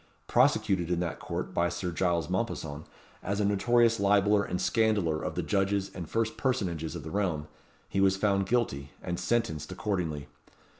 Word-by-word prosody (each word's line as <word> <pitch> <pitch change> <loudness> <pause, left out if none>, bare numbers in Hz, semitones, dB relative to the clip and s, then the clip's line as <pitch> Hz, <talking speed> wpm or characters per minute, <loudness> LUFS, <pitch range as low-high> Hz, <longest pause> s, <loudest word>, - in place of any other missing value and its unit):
Prosecuted 90 -4 +2
in 90 -1 +1
that 85 -2 -3
court - - -4
by 85 0 +2
Sir 90 0 -3
Giles 85 -2 0
Mompesson, 85 -6 -3 0.4
as 100 +2 -2
a 105 - +2
notorious 115 +3 +3
libeller 100 +1 +4
and 90 - -3
scandaller 105 -9 +1
of - - -3
the - - -1
judges 100 -1 0
and 85 -4 -7
first 115 -1 -1
personages 90 - -1
of 80 - -6
the 80 - -7
realm, 90 -7 -1 0.4
he 95 - 0
was 95 0 +4
found 100 -1 +1
guilty, 75 - -1
and 90 -1 -3
sentenced 110 -11 -1
accordingly. 85 -9 -2
95 Hz, 165 wpm, -29 LUFS, 85-105 Hz, 0.4 s, libeller